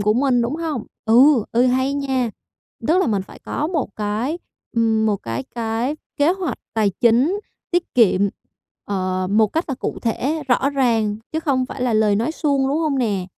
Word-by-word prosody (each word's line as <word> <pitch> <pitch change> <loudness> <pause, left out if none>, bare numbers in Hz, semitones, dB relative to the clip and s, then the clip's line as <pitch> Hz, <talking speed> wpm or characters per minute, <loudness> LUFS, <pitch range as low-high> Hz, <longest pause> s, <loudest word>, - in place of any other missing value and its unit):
của 210 +1 +2
mình, 250 -1 +2
đúng 250 +6 -2
hông? 315 -8 -3 0.2
Ừ, 240 +1 +5
ừ, 245 +2 +4
hay 260 +2 +1
nha. 265 -4 -1 0.6
Tức 345 +4 +4
là 380 - +2
mình 205 -4 0
phải - - -14
có 300 - -3
một 320 -5 -1
cái, 220 +9 -2 0.4
ừm, 220 -1 +2
một 205 -2 +2
cái 115 +3 -4
cái 230 +5 -1 0.2
kế 290 +4 +3
hoạch 375 -3 -3 0.2
tài 215 -3 +2
chính 255 - +3 0.3
tiết 350 0 -1
kiệm, 215 -6 +4 0.6
ờ, 185 -2 -1
một 215 +1 +4
cách 325 +2 0
là 270 - -1
cụ - - -4
thể, 280 +7 -1
rõ 265 +3 +2
ràng 225 -6 +1 0.2
chứ 320 - -1
không 260 -5 0
phải 260 - -6
là 245 -2 +1
lời 210 -2 +3
nói 235 +9 0
suông, 280 -4 +1
đúng 290 +3 0
hông 300 -4 0
nè? 200 -7 0
245 Hz, 195 wpm, -21 LUFS, 220-285 Hz, 0.6 s, Ừ